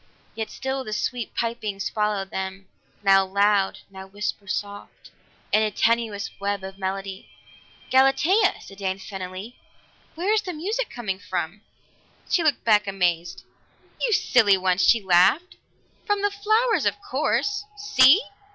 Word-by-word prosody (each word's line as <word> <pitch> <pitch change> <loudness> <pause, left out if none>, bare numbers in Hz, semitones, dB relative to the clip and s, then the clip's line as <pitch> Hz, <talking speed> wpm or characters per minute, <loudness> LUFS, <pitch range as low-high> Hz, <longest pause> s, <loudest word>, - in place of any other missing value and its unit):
Yet 220 -1 -4
still 265 0 -4
the 215 - -6
sweet 235 +2 -3
pipings 220 -4 -3
followed 210 -2 -1
them, 190 0 -5 0.4
now 195 -1 +5
loud, 200 +1 +1
now 190 0 -10
whisper 205 +1 -5
soft, 205 +1 -6 0.4
in 215 - +4
a 215 - +1
tenuous 220 -1 0
web 200 -1 -2
of 190 0 -9
melody. 195 0 -5 0.6
"Galatea!" 270 +10 +4
said 195 0 -13
Dan 190 -1 -2
suddenly. 195 +3 -8 0.6
"Where 370 +6 0
is 435 - +2
the 370 -3 -6
music 425 +10 -3
coming 205 -6 -4
from?" 185 0 -4 0.7
She 350 - +2
looked 295 -5 +1
back 210 -2 +3
amazed. 175 -3 -1 0.6
"You - - +1
silly 220 - +4
one!" 185 0 +1
she 215 +4 +4
laughed. 190 - +3 0.5
"From 410 -1 0
the 410 - +2
flowers, 435 +4 +1
of - - +1
course. 410 0 -1
See!" 365 - +5
210 Hz, 140 wpm, -24 LUFS, 195-270 Hz, 0.7 s, now